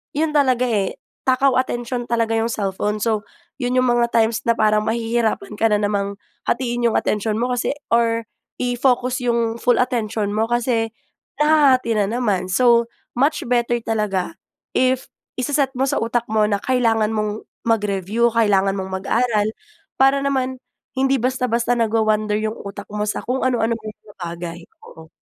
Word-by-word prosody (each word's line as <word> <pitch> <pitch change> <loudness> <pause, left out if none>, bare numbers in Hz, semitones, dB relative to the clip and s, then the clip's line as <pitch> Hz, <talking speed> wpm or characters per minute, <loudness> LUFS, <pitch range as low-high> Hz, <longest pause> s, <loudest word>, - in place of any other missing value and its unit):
yun 310 +1 +1
talaga, 260 -4 +3
eh, 210 -6 0 0.3
takaw 260 0 +3
atensyon 240 -1 -3
talaga 230 -1 0
yung 225 0 +1
cellphone. 205 -1 -2
So, 215 -3 0 0.3
yun 250 0 -1
yung 255 -1 +3
mga 240 0 +3
times 225 0 +3
na 235 - +4
parang 215 -1 +2
mahihirapan 225 -2 -1
ka 225 - +4
na 210 -1 +1
namang 200 -1 -1 0.3
hatiin 240 -1 0
yung 225 - 0
atensyon 210 +1 0
mo, 245 +3 -1
kasi 245 +3 -1 0.2
or 230 0 +2 0.4
i-focus 250 +1 +1
yung 235 -2 0
full 245 -1 +3
attention 220 -4 -2
mo, 220 +2 0
kasi 230 -2 0 0.5
nahahati 280 -6 +4
na 200 - +2
naman. 205 -5 0
So, 235 +3 +4 0.3
much 285 +4 +2
better 240 0 +1
talaga, 210 - -2 0.3
if 255 0 +1 0.2
ise-set 270 +1 0
mo 260 - 0
sa 270 - +1
utak 235 +1 0
mo 215 -1 +3
na 200 -1 -1
kailangan 225 -4 +2
mong 215 -1 -2 0.2
mag-review, 210 0 +1
kailangan 195 -3 +3
mong 190 -1 -4
mag-aral, 220 -1 +1 0.5
para 270 +1 +4
naman 260 -2 -1 0.4
hindi 270 0 +3
basta-basta 245 -1 0
nagwa-wnder 215 -2 +1
yung 220 +1 -3
utak 200 0 -7
mo 210 0 -2
sa 210 - -2
kung 255 +2 -1
anu-anong 230 -2 0
maliit 215 -1 -10
na 205 -1 -16
bagay. 170 0 -6 0.3
Oo. 160 0 -13
230 Hz, 155 wpm, -21 LUFS, 210-250 Hz, 0.5 s, na